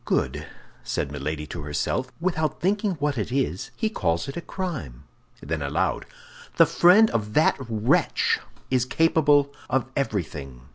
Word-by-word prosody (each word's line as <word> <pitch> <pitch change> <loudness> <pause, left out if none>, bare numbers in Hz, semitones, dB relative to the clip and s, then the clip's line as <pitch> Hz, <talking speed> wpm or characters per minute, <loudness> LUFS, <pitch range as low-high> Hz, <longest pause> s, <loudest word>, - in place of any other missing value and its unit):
"Good," 75 +3 -1 0.4
said 70 - -2
Milady 75 +2 -4
to 80 +1 -7
herself; 75 - -2
"without 160 -4 -1
thinking 200 +3 +1
what 145 -5 -1
it 105 - -3
is, 130 -9 -1
he 220 - +1
calls 85 - -1
it 135 - -6
a 170 - -4
crime!" 155 - -5 0.4
Then 80 +1 -3
aloud, 70 -1 -1 0.5
"The - - +8
friend 200 +6 +5
of 105 -1 -2
that 155 - +4
wretch 110 0 +1 0.3
is 130 -2 +3
capable 145 0 +3 0.2
of 130 -2 +1
everything." 75 - -3
125 Hz, 145 wpm, -25 LUFS, -, 0.5 s, The